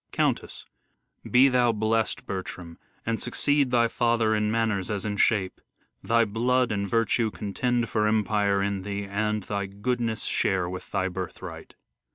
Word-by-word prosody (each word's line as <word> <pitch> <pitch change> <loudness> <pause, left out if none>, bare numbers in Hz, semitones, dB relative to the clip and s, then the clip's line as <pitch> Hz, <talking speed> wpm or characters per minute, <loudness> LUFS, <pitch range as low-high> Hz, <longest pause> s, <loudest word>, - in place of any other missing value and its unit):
Countess: - - -1 0.6
Be 130 +2 +6
thou 125 -2 +3
blest, 110 +1 0
Bertram, 90 -3 -6 0.3
and 115 0 -1
succeed 145 -2 +2
thy 120 -1 +3
father 115 -2 +1
In 105 0 +1
manners 110 -4 0
as 105 -2 -2
in 105 -1 -2
shape! 100 -3 +1 0.4
Thy 115 0 +3
blood 125 +3 +1
and 100 -2 -2
virtue 115 0 +1
Contend 115 +4 -1
for 105 -1 +1
empire 105 -2 +1
in 100 -1 -1
thee; 100 +1 -4
and 105 +1 -1
thy 100 -1 -3
goodness 115 +3 -2
Share 95 -3 +1
with 90 +1 -7
thy 95 -2 0
birthright. 90 -1 -7
105 Hz, 150 wpm, -26 LUFS, 100-115 Hz, 0.6 s, Be